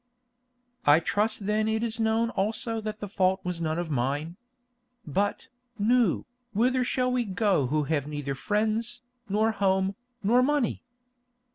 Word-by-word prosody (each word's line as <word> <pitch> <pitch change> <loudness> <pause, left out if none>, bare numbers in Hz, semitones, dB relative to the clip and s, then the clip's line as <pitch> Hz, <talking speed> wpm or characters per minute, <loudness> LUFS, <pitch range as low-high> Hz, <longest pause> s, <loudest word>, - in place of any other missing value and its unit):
"I 145 +2 +6
trust 210 +3 0
then 215 +1 +1
it 220 +1 0
is 230 -1 -2
known 225 +1 +1
also 225 +3 -2
that 215 0 -5
the 205 - -3
fault 190 -1 +1
was 180 -2 -3
none 160 0 -1
of 170 -2 -3
mine. 145 +6 -1 0.7
But, 200 +7 -1 0.3
Nou, 230 -2 +3 0.3
whither 250 +4 +2
shall 250 0 0
we 250 -1 +1
go 195 - +1
who 150 +3 +1
have 145 -1 -1
neither 145 -2 -3
friends, 220 - -1 0.3
nor 215 +3 +2
home, 190 -2 +1 0.3
nor 235 +5 +4
money?" 285 -2 +1
210 Hz, 145 wpm, -27 LUFS, 170-225 Hz, 0.7 s, I